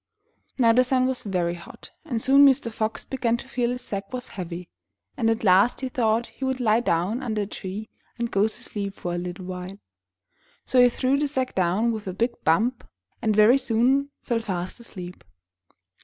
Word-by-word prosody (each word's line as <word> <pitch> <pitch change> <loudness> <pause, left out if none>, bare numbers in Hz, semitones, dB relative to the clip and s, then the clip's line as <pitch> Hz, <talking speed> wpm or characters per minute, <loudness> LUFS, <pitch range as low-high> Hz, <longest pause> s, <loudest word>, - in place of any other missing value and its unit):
Now 230 -3 +5
the 250 +2 +5
sun 255 0 +2
was 260 -1 -1
very 180 -4 -1
hot, 170 -1 -12
and 245 -8 -2
soon 275 +4 +6
Mr. 250 -3 +2
Fox 220 0 -3
began 240 -3 0
to 260 - -10
feel 245 -2 -1
his 250 +1 -4
sack 195 -1 -5
was 255 0 -4
heavy, 175 -2 -6 0.5
and 230 -5 +1
at 225 0 0
last 195 +6 +4
he 260 - -2
thought 230 -2 +1
he 270 - -10
would 265 -1 -1
lie 225 -2 +3
down 205 +2 0
under 220 -5 -1
a - - -3
tree 200 +2 -6 0.3
and 235 -1 -2
go 200 +2 +3
to - - -5
sleep 200 -2 -5
for 175 - -4
a 175 - -2
little 180 +1 -6
while. 185 +1 -6 0.9
So 255 - +4
he 245 - +7
threw 260 +3 +1
the 295 - +1
sack 260 -3 -2
down 190 +6 +1
with 215 -3 -5
a 185 - -3
big 235 +6 0
bump, 225 +10 +2 0.4
and 215 -2 +1
very 220 +5 +6
soon 260 +3 +2
fell 235 -2 0
fast 185 -2 -4
asleep. 180 -6 -9
225 Hz, 200 wpm, -25 LUFS, 190-250 Hz, 0.9 s, he